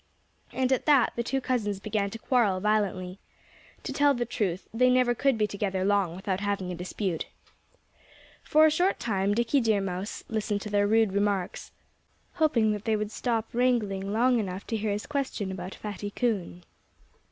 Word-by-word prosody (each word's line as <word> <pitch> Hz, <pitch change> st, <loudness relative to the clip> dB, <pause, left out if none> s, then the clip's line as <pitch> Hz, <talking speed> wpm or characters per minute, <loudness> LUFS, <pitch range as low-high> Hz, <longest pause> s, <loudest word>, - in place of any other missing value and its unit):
And 260 Hz, 0 st, 0 dB
at 260 Hz, -, +1 dB
that 280 Hz, -5 st, +5 dB
the 235 Hz, -, -1 dB
two 270 Hz, +3 st, -1 dB
cousins 220 Hz, -6 st, -1 dB
began 200 Hz, 0 st, -1 dB
to 225 Hz, -, -7 dB
quarrel 220 Hz, -5 st, +2 dB
violently. 195 Hz, -3 st, -1 dB, 0.6 s
To -, -, -4 dB
tell 285 Hz, -1 st, +3 dB
the 240 Hz, 0 st, -1 dB
truth, 200 Hz, -6 st, -2 dB
they 250 Hz, +2 st, +4 dB
never 250 Hz, -1 st, +3 dB
could 270 Hz, 0 st, +1 dB
be 215 Hz, -, +2 dB
together 195 Hz, -2 st, -2 dB
long 200 Hz, -4 st, +1 dB
without 190 Hz, 0 st, -2 dB
having 200 Hz, -3 st, -2 dB
a -, -, -4 dB
dispute. 180 Hz, 0 st, -3 dB, 1.1 s
For 310 Hz, +1 st, +5 dB
a 315 Hz, -, +5 dB
short 360 Hz, +5 st, +1 dB
time 200 Hz, -2 st, 0 dB
Dickie 235 Hz, +4 st, +2 dB
Deer 220 Hz, -3 st, +2 dB
Mouse 190 Hz, +1 st, -4 dB
listened 210 Hz, -2 st, -2 dB
to 210 Hz, -, -6 dB
their 205 Hz, 0 st, +3 dB
rude 220 Hz, -2 st, +3 dB
remarks, 200 Hz, -1 st, -1 dB, 0.6 s
hoping 255 Hz, -10 st, +2 dB
that 210 Hz, 0 st, -4 dB
they 220 Hz, -1 st, +2 dB
would 210 Hz, 0 st, -3 dB
stop 230 Hz, -1 st, -2 dB
wrangling 215 Hz, -6 st, +1 dB
long 240 Hz, +3 st, +3 dB
enough 190 Hz, -2 st, -4 dB
to 225 Hz, -, -3 dB
hear 215 Hz, 0 st, -1 dB
his 205 Hz, +1 st, -2 dB
question 265 Hz, -9 st, -3 dB
about 185 Hz, 0 st, -6 dB
Fatty 205 Hz, -1 st, -6 dB
Coon. 200 Hz, -, -2 dB
210 Hz, 175 wpm, -27 LUFS, 195-240 Hz, 1.1 s, that